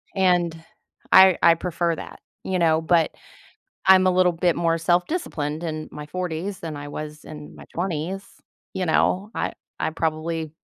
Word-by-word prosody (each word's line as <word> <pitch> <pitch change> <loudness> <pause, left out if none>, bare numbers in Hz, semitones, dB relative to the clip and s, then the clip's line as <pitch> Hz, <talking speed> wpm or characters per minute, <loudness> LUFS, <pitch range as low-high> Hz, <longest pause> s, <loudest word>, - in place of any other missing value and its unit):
And, 175 -4 +1 0.5
I 190 -2 +8
I 170 - +8
prefer 170 0 -1
that. - - -10 0.2
You 190 - -1
know? 160 -2 +3
But, 165 0 +2 0.8
I'm 190 0 +7
a - - +4
little 180 0 +4
bit 170 0 +1
more 165 -1 +1
self-disciplined 170 - -1
in 155 -2 -4
my 150 0 -8
40s 180 +3 -4
than 160 -2 -6
I 145 0 -7
was 150 +1 -7
in 150 -1 -10
my - - -12
20s. 175 +2 -3 0.5
You 185 - -2
know? 185 +5 +1
I - - -2 0.3
I - - 0
probably 160 0 -2
170 Hz, 160 wpm, -23 LUFS, 155-185 Hz, 0.8 s, I